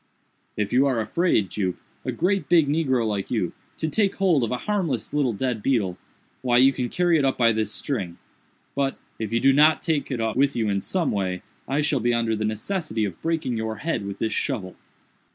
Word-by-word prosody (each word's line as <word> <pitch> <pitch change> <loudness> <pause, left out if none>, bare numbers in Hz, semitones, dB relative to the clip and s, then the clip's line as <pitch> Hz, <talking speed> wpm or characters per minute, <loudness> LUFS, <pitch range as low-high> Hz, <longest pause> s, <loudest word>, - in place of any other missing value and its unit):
"If 105 0 -1
you 135 +3 +4
are 130 -4 +1
afraid, 110 - +1
Jup, 95 -4 -1 0.3
a - - -2
great 185 -4 0
big 165 -4 +5
negro 140 -6 +1
like 105 -3 -2
you, 100 -8 -1 0.2
to 160 - -1
take 200 +5 +1
hold 175 -9 +3
of 115 - 0
a 125 - -1
harmless 170 - -1
little 145 -4 +2
dead 120 0 -2
beetle, 105 -8 +1 0.5
why 120 -2 +2
you 135 +2 +6
can 125 -2 -2
carry 175 -2 +2
it - - +1
up 135 -1 +1
by 115 -2 +4
this 110 -1 0
string—but, 135 +5 -5 0.2
if 110 -1 -3
you 115 - +2
do 135 +2 +5
not 155 +3 +5
take 155 -4 0
it 130 -4 -2
up 110 -1 -1
with 140 +1 +2
you 110 -3 0
in 100 -1 0
some 175 - 0
way, 95 -3 -2 0.2
I 140 +3 +1
shall 150 -2 +1
be 120 0 +1
under 115 -1 +1
the 110 0 -2
necessity 110 - -2
of 95 -5 -6
breaking 155 -7 -1
your 110 0 -2
head 155 -3 -2
with 100 0 -5
this 110 +1 -1
shovel." 105 -10 -2
125 Hz, 210 wpm, -24 LUFS, 110-150 Hz, 0.5 s, you